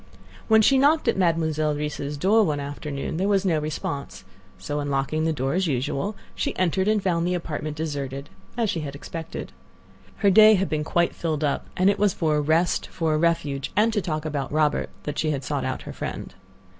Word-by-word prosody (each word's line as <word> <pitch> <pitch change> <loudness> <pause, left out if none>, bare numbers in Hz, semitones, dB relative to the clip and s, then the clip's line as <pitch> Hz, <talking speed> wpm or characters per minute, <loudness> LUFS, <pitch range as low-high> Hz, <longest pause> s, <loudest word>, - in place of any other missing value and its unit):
When 220 -1 +5
she 270 +4 +5
knocked 300 +4 +3
at - - +3
Mademoiselle 160 -4 +1
Reisz's 150 -1 -4
door 210 +8 +4
one 150 -6 0
afternoon 145 +1 -4
there 190 +3 0
was 200 -1 +2
no 165 -4 +2
response; 150 -2 -5 0.3
so 145 +11 -4
unlocking 145 +2 -1
the 160 - +2
door, 135 -2 -1
as 185 0 +1
usual, 140 - -1 0.2
she - - -3
entered 185 +2 +1
and 215 -2 +2
found 170 -2 +1
the 180 - +1
apartment 155 -3 -4
deserted, 140 -3 -4 0.3
as 230 -2 +1
she 165 - -2
had 140 -2 -5
expected. 160 +3 -7 0.6
Her 200 - +3
day 215 +2 +8
had 195 0 0
been 155 -1 -1
quite 170 +2 +1
filled 155 -2 -2
up, 145 -2 -1
and 185 - +3
it 200 0 +3
was 205 -2 +2
for 155 -2 +1
a - - +2
rest, 160 +4 +1
for 160 -2 -1
a - - +2
refuge, 150 -5 0
and 220 +2 +3
to 210 - +1
talk 155 -3 -3
about 145 -3 -3
Robert, 150 0 +1
that 150 - -4
she 155 -3 0
sought 130 - -3
out - - -3
her - - -8
friend. - - -6
155 Hz, 205 wpm, -24 LUFS, 145-185 Hz, 0.6 s, day